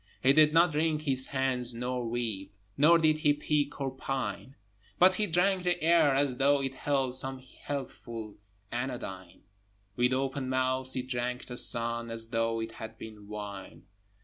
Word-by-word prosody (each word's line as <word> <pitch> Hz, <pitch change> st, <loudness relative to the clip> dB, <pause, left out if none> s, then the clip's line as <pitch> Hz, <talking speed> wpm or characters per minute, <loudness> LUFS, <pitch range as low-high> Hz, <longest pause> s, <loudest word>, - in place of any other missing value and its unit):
He 135 Hz, +1 st, +5 dB
did 155 Hz, 0 st, +5 dB
not 165 Hz, +1 st, +4 dB
wring 155 Hz, +1 st, +1 dB
his 135 Hz, -4 st, +2 dB
hands 130 Hz, -3 st, +1 dB
nor 125 Hz, +1 st, -3 dB
weep, 115 Hz, -5 st, -3 dB, 0.2 s
Nor 160 Hz, +4 st, +5 dB
did 155 Hz, -2 st, +2 dB
he 150 Hz, -1 st, +3 dB
peek 145 Hz, 0 st, -1 dB
or 135 Hz, -1 st, -2 dB
pine, 135 Hz, 0 st, -5 dB, 0.4 s
But 185 Hz, +1 st, +6 dB
he 210 Hz, +2 st, 0 dB
drank 185 Hz, +2 st, +2 dB
the 175 Hz, -1 st, 0 dB
air 165 Hz, -4 st, +4 dB
as 135 Hz, -2 st, 0 dB
though 140 Hz, +1 st, +3 dB
it 135 Hz, -1 st, -3 dB
held 135 Hz, -2 st, -1 dB
Some 130 Hz, +1 st, +2 dB
healthful 120 Hz, -5 st, -7 dB, 0.3 s
anodyne; 105 Hz, -8 st, -6 dB, 0.5 s
With 125 Hz, +1 st, +2 dB
open 135 Hz, 0 st, -2 dB
mouth 130 Hz, 0 st, -1 dB
he 130 Hz, -, -3 dB
drank 125 Hz, -1 st, -3 dB
the 125 Hz, -, -7 dB
sun 115 Hz, -1 st, +3 dB
As 115 Hz, 0 st, -5 dB
though 115 Hz, -1 st, -1 dB
it 115 Hz, 0 st, -4 dB
had 110 Hz, -1 st, -9 dB
been 105 Hz, -2 st, -11 dB
wine! 105 Hz, -2 st, -8 dB
130 Hz, 165 wpm, -29 LUFS, 115-145 Hz, 0.5 s, But